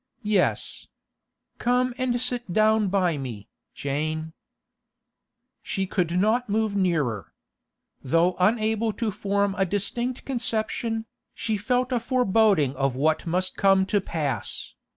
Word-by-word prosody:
'Yes. 205 -3 0 0.7
Come 250 +1 +1
and 255 -2 0
sit 245 -4 -1
down 215 +1 +3
by 180 -5 +1
me, 115 -5 -7 0.3
Jane.' 155 +3 -3 1.3
She 195 -1 -2
could 180 -2 0
not 220 +4 +2
move 215 0 0
nearer. 155 - 0 0.7
Though 165 +7 +2
unable 220 +2 +2
to 220 +1 -2
form 200 0 0
a 195 - +4
distinct 235 +6 -2
conception, 225 -2 -2 0.3
she 220 - -1
felt 250 +5 0
a 245 - +2
foreboding 220 - +2
of 135 -2 0
what 155 +5 +1
must 185 +2 0
come 195 -1 +4
to 205 - +4
pass. 150 -7 -3
200 Hz, 120 wpm, -25 LUFS, 165-225 Hz, 1.3 s, a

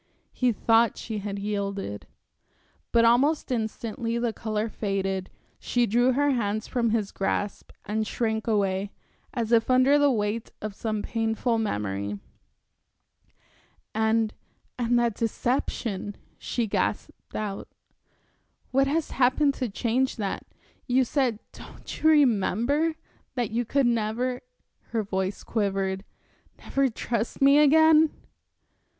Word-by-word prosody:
He 250 -1 +1
thought 225 +1 +3
she 220 -2 -4
had 200 0 -4
yielded. 200 - -3 0.8
But 230 0 +5
almost 270 +6 +3
instantly 230 0 -2
the 235 -1 -1
color 215 -1 -2
faded, 195 -3 -2 0.3
she 245 -1 +1
drew 245 +4 +3
her 285 +2 +2
hands 215 -3 -1
from 235 -2 0
his 215 -3 0
grasp 200 +1 -2 0.2
and 215 +1 -1
shrank 220 -1 -1
away, 200 -2 +1 0.4
as 235 -4 -2
if 230 0 +3
under 255 +3 +5
the 290 0 +5
weight 220 -2 -1
of 215 -1 -5
some 215 0 -3
painful 225 +1 0
memory. 100 - -2 1.8
"And, 220 0 +1 0.5
and 240 0 +2
that 235 -2 +2
deception," 225 -3 -2 0.2
she 240 - -1
gasped 210 - -3
out. 205 -2 -4 1.0
"What 270 +1 +3
has 310 +3 -1
happened 270 +3 +3
to 250 - 0
change 245 +5 0
that? 200 -4 -4 0.4
You 255 +1 +3
said 250 -4 +1
don't - - -10
you 315 - +5
remember? 285 - +3 0.4
that 240 -5 -1
you 235 +2 0
could 275 +3 +2
never" 240 +2 0 0.5
her 225 -2 -1
voice 190 0 -3
quivered 195 -3 -1 0.5
"never 275 -1 0
trust 230 0 -3
me 275 +1 +6
again." 315 +1 +6
230 Hz, 120 wpm, -26 LUFS, 205-255 Hz, 1.8 s, me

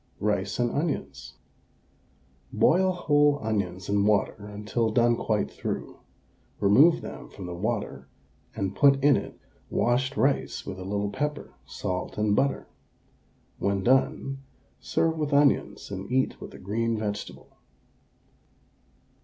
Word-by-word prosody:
RICE 105 -1 -1
AND 120 -1 +1
ONIONS. 70 - -3 1.2
Boil 185 - +3
whole 145 -5 +3
onions 95 -4 -2
in 100 0 +2
water 105 0 +1
until 105 +2 -2
done 120 +1 +3
quite 110 -2 -1
through, - - -5 0.6
remove 135 +12 +5
them - - -8
from 95 - -9
the 90 - -5
water, 100 - -3 0.5
and 95 0 -2
put 140 +3 +6
in 145 -1 +6
it - - -5 0.3
washed 130 +3 0
rice 135 +1 0
with 95 -1 -6
a - - -6
little 100 +1 -2
pepper, 150 +4 -3
salt, 90 0 -4
and 105 -1 +2
butter. 140 +4 0 0.9
When 100 -1 0
done, 135 +2 +1 0.4
serve 160 -1 0
with 150 -2 -1
the 140 - +3
onions 145 -6 +1
and 95 +3 -6
eat 130 +1 0
with - - -9
a - - -9
green 115 +4 -1
vegetable. 105 -1 -6
110 Hz, 130 wpm, -27 LUFS, 100-140 Hz, 1.2 s, put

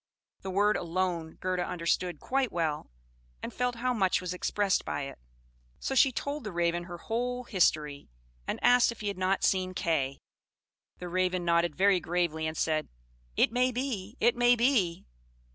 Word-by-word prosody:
The 190 - -5
word 205 +3 +2
"alone" 170 -2 -2
Gerda 185 -1 -1
understood 175 -1 -1
quite 265 -2 0
well, 160 -3 -2 0.5
and - - -5
felt 250 0 -1
how 250 +2 0
much 190 -5 +2
was 180 -1 -4
expressed 195 +2 0
by 145 - -3
it; 135 - -8 0.6
so - - -3
she 270 0 +5
told 285 +4 -4
the 210 - -5
Raven 175 0 0
her 175 -1 -8
whole 245 +6 -2
history, 155 - 0 0.4
and - - -2
asked 245 -1 +5
if 235 - -10
he 205 - -1
had 200 - -5
not 190 +1 +1
seen 185 -1 +1
Kay. 140 -6 0 0.8
The 180 - -7
Raven 180 0 0
nodded 170 -2 +2
very 195 0 +4
gravely, 165 -2 -1
and 155 0 -5
said, 155 -1 0 0.5
"It - - +4
may 250 +2 +2
be 245 -3 -4
it 235 +1 +3
may 245 0 +5
be!" 230 -9 +1
185 Hz, 170 wpm, -29 LUFS, 170-235 Hz, 0.8 s, she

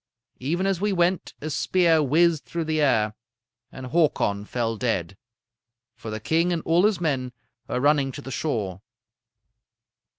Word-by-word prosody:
Even 170 +9 -1
as 195 -2 0
we 205 0 +1
went, 180 0 0
a 155 +1 -4
spear 165 +1 +3
whizzed 160 +2 +3
through 170 -1 -3
the 155 -1 0
air, 110 -7 +2 0.6
and 130 - -8
Hakon 105 -11 +1
fell 115 0 -2
dead; 100 -6 -2 0.8
for 110 - -8
the 110 0 -4
king 165 +10 +1
and 170 -2 -1
all 170 +4 +3
his 210 -4 -1
men 135 -7 -1 0.3
were - - -2
running 140 0 +2
to 145 - -7
the 135 - -7
shore. 105 - -2
150 Hz, 155 wpm, -24 LUFS, 120-170 Hz, 0.8 s, spear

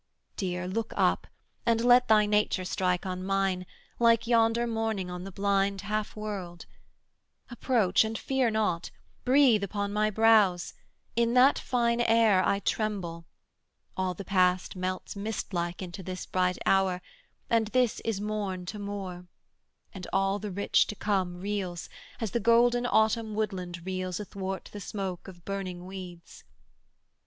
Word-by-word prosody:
Dear, 180 -2 -3
Look 225 +4 -3
up, - - +2 0.4
and 230 0 +2
let 245 0 +6
thy 215 -2 +5
nature 210 -3 +1
strike 180 -1 0
on 185 0 -4
mine, 190 -1 0 0.3
Like 230 -1 +4
yonder 230 0 +3
morning 220 -5 -2
on 180 +1 -6
the 195 - -7
blind 195 0 0
half 210 0 -3
world; 195 -5 -6 0.9
Approach 230 -6 +2
and 220 0 -3
fear 265 -1 +1
not; 210 -6 0 0.4
breathe 255 -5 +5
upon 200 +1 -3
my 215 0 +2
brows; 215 -5 +4 0.4
In 235 +1 +2
that 260 +3 +6
fine 235 -1 +1
air 225 -5 +4
I 200 - +2
tremble, 185 -7 -2 0.7
all 185 -1 -1
the 195 - -8
past 185 -1 +2
Melts 185 +2 -4
mist 205 0 -4
like 175 +1 -2
into 180 +2 -7
this 185 0 -6
bright 180 -1 0
hour, 190 -2 +3 0.5
and 225 -2 +2
this 245 +1 +1
Is 225 -3 -2
morn 205 -3 -3
to 210 +4 -6
more, 195 -3 -6 0.7
and 185 -2 -8
all 195 +1 +1
the 210 +1 -5
rich 200 +2 +2
to 210 - -5
come 190 -4 -1
Reels, 190 -3 -4 0.3
as 225 -5 -3
the 235 - 0
golden 240 +2 +4
Autumn 220 -1 +2
woodland 180 -5 -3
reels 185 -1 -3
Athwart 195 -2 -5
the 205 - -7
smoke 190 -2 -5
of 175 -3 -12
burning 185 -3 -5
weeds. 180 -2 -10
200 Hz, 145 wpm, -28 LUFS, 185-220 Hz, 0.9 s, let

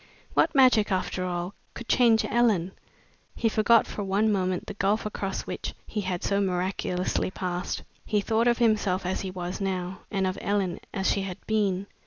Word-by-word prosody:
What - - +3
magic, 250 -6 +5
after 185 0 -1
all, 175 +1 -3 0.2
could 235 - -8
change 230 -3 +4
Ellen! 215 -7 +2 0.6
He 230 - +1
forgot 225 +1 +4
for 205 - -5
one 200 +3 +2
moment 185 -2 0
the - - -6
gulf 205 +2 0
across 195 -2 -3
which - - -5
he 210 - -3
had 185 -2 -3
so 200 0 +1
miraculously 185 -1 -1
passed. 180 -1 -3 0.2
He 210 - +1
thought 225 +3 +1
of 240 -1 +3
himself 210 -6 +2
as 185 - -1
he 190 - -4
was 180 +1 -5
now, 185 -1 -2
and 195 -2 0
of 185 +1 -2
Ellen 195 -4 0
as 190 -2 -1
she 200 - 0
had 190 -2 -5
been. 200 -3 +1
195 Hz, 180 wpm, -27 LUFS, 185-215 Hz, 0.6 s, magic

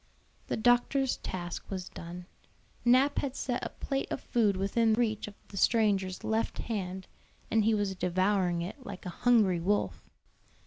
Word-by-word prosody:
The - - -1
doctor's 245 +3 +3
task 175 -1 -5
was 185 -2 -4
done. 175 +1 -8 0.6
Nap 255 +4 +4
had 270 -2 -3
set 245 -2 -2
a - - -2
plate 275 0 -3
of - - -1
food 215 -6 +1
within 220 +4 +2
reach 220 -3 0
of 205 - -10
the 195 - -9
stranger's 195 -4 +2
left 220 +1 -1
hand, 190 -4 -4 0.5
and 220 -2 +3
he 225 0 +4
was 205 -2 0
devouring 185 -1 +1
it 205 +10 -7
like 200 -6 -8
a - - -3
hungry 210 -3 +3
wolf. 165 - -1
205 Hz, 160 wpm, -30 LUFS, 185-235 Hz, 0.6 s, Nap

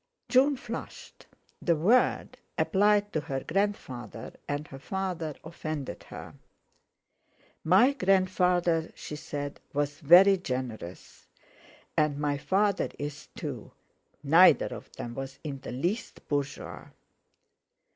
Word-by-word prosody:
June 275 +2 +4
flushed. 235 -1 -8 0.3
The 170 - +2
word 220 +11 +2 0.2
applied 205 +1 +3
to 155 - +1
her 135 -2 -3
grandfather 130 - -3 0.2
and 145 +1 -2
father 175 -4 -3
offended 155 -3 -6
her. - - -9 1.3
"My 195 - +5
grandfather," 180 - +2
she 150 - -7
said, 145 -1 -5
"was 145 +1 -1
very 180 +5 +7
generous, 125 - -6 0.7
and 150 -2 +2
my 145 -1 -1
father 195 +5 +1
is, 145 0 -6
too; - - -6 0.5
neither 165 +6 +6
of - - -11
them 120 - -6
was 135 +2 -6
in 140 -3 -5
the - - -7
least 175 - -3
bourgeois." 140 -1 -3
160 Hz, 105 wpm, -28 LUFS, 145-195 Hz, 1.3 s, very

